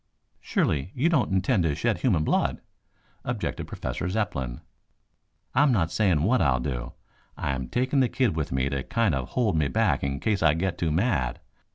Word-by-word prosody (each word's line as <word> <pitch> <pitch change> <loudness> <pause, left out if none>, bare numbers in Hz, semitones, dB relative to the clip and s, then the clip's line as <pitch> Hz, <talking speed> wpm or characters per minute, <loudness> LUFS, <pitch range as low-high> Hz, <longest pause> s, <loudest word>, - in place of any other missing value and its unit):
"Surely, 75 +5 0
you 145 +7 +2
don't 140 - +2
intend 95 +3 +2
to 80 -4 +1
shed 110 -1 0
human 90 -8 +2
blood?" - - +1 0.6
objected - - -3
Professor 90 - -4
Zepplin. 70 - -2 0.9
"I - - +4
am 145 -2 +5
not 85 -8 +1
saying 90 -5 +2
what 120 +7 +3
I'll 65 -4 +3
do. 60 -2 -4 0.4
I - - -1
am 65 -2 -3
taking 130 - 0
the 130 -2 +3
kid 125 -10 +1
with 80 -2 -2
me 65 0 +1
to 70 -1 -2
kind 110 - 0
of 65 -2 -2
hold 110 -8 +1
me 75 -2 +2
back 95 - +1
in 70 0 -2
case 105 +2 0
I 80 -2 +4
get 90 +1 -2
too 85 - 0
mad. 75 - 0
85 Hz, 190 wpm, -26 LUFS, 70-110 Hz, 0.9 s, am